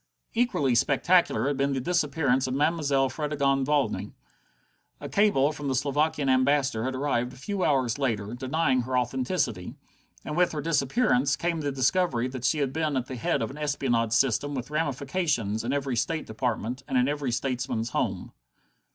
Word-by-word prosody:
Equally 225 - +1
spectacular 150 +10 +3
had 145 -1 -1
been 140 0 +1
the 135 - -1
disappearance 140 -4 +1
of 130 - -2
Mademoiselle 145 -2 +2
Fredegonde 140 -2 0
Valmy. 145 -2 0 0.9
A - - -6
cable 175 -9 +3
from 145 -1 -6
the 135 - 0
Slovakian 145 +2 0
Ambassador 130 -2 +2
had 130 0 -2
arrived 130 -2 -1
a - - -12
few 185 +9 -3
hours 130 -3 +1
later, 110 -5 -1
denying 130 +1 0
her 130 +1 -2
authenticity. 125 - -1 0.5
And 150 - -4
with 180 0 +2
her 150 - -3
disappearance 140 - +2
came 170 0 -2
the 145 -1 -1
discovery 130 -1 +1
that 130 -1 -6
she 155 - +2
had 140 -3 -1
been 155 -3 0
at 125 - -1
the 130 - -7
head 115 -1 0
of 110 - -4
an 145 - -10
espionage 125 -6 0
system 135 +4 +1
with 130 +2 -5
ramifications 140 - -1
in 120 - -2
every 140 -2 -1
state 160 +7 -1
department, 120 +2 -3
and 130 - 0
in 125 +1 +3
every 145 -3 -1
statesman's 120 -2 -2
home. - - -2
135 Hz, 170 wpm, -27 LUFS, 125-150 Hz, 0.9 s, spectacular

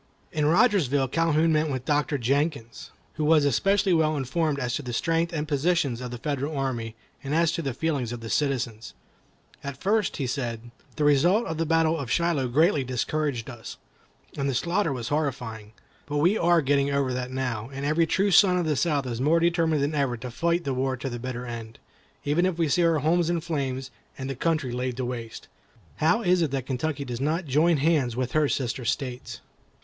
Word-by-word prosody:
In 150 -1 0
Rogersville 160 - +3
Calhoun 165 +1 +2
met 155 +1 +2
with 130 -3 -3
a - - -32
Doctor 150 +1 +1
Jenkins, 140 -1 -2 0.3
who 155 - -1
was 150 -1 +4
especially 195 - +2
well 155 -2 +2
informed 140 +3 -1
as 125 -3 -2
to - - -1
the 125 -3 -6
strength 165 +6 0
and 155 -2 -3
positions 145 -4 0
of 125 - -5
the 120 - -6
Federal 145 +3 -3
army, 120 -5 -3 0.3
and 140 +2 -2
as 165 0 +3
to - - -2
the 135 -5 -3
feelings 140 -6 -1
of 120 - -5
the 115 - -8
citizens. 125 -6 -2 0.7
"At 140 -2 -5
first," 210 +2 +1
said 120 -3 -3
he, 120 - -14 0.2
"the 150 - -1
result 170 - +4
of 160 0 -4
the 165 - 0
battle 165 0 +2
of 135 -4 -5
Shiloh 165 -3 +1
greatly 150 +3 +3
discouraged 130 0 -2
us, 120 -3 -9 0.6
and 140 -1 -1
the 135 - -1
slaughter 175 +5 0
was 120 -4 -4
horrifying. 120 -8 -3 0.4
But 145 0 -2
we 175 +8 +3
are 170 -5 +3
getting 140 0 +2
over 140 -2 0
that 125 0 -3
now, 125 -4 -3
and 135 +1 -5
every 160 +3 +2
true 195 +4 +1
son 185 -1 +6
of 175 - 0
the 155 -1 +1
South 145 -2 0
is 120 -1 -4
more 155 +5 +3
determined 165 -3 +2
than 145 +2 -1
ever 140 -5 0
to 125 +2 -7
fight 170 +7 0
the 135 - -2
war 130 0 -1
to 130 +1 -5
the 120 - -5
bitter 125 0 -5
end, 115 -2 -7 0.5
even 160 +6 +2
if 180 -3 -2
we 165 -3 +1
see 175 +5 +3
our 165 -1 +3
homes 165 +3 +2
in 175 -1 +1
flames 135 -5 -3 0.3
and 130 - -5
the - - -4
country 155 -2 0
laid 125 0 -3
waste. 120 -3 -5 0.5
How 170 +9 +2
is 180 -1 +3
it 160 - +1
that 135 -2 -3
Kentucky 140 +2 -2
does 120 -1 -5
not 160 +5 0
join 155 +4 +3
hands 140 -5 +1
with 125 0 -2
her 155 -2 +2
sister 125 -1 -2
states?" 125 +1 -3
145 Hz, 205 wpm, -26 LUFS, 125-165 Hz, 0.7 s, son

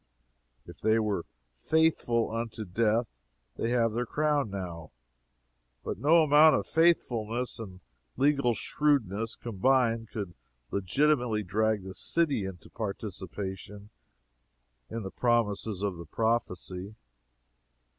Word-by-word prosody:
If - - -13
they 110 +1 +3
were 105 -6 -1 0.3
"faithful 120 - +1
unto 115 -1 -4
death," 110 +5 +1 0.5
they 115 - -1
have 115 -2 +2
their 120 +1 -1
crown 150 -4 +1
now 85 -5 -6 0.9
but - - -4
no 160 +3 +5
amount 155 +1 +7
of - - -1
faithfulness 125 -9 +1
and 95 -4 -9 0.4
legal 135 -3 +3
shrewdness 115 -9 0
combined 115 0 +1
could 100 -6 -5 0.4
legitimately 120 +2 +1
drag 105 +2 0
the 95 0 -7
city 145 - 0
into 95 -3 -8
a - - -21
participation 100 0 -6 1.0
in 115 -1 -4
the 95 - -6
promises 110 -4 0
of 100 -4 -1
the 85 -1 -9
prophecy. 100 -2 -2
110 Hz, 115 wpm, -29 LUFS, 100-125 Hz, 1.0 s, amount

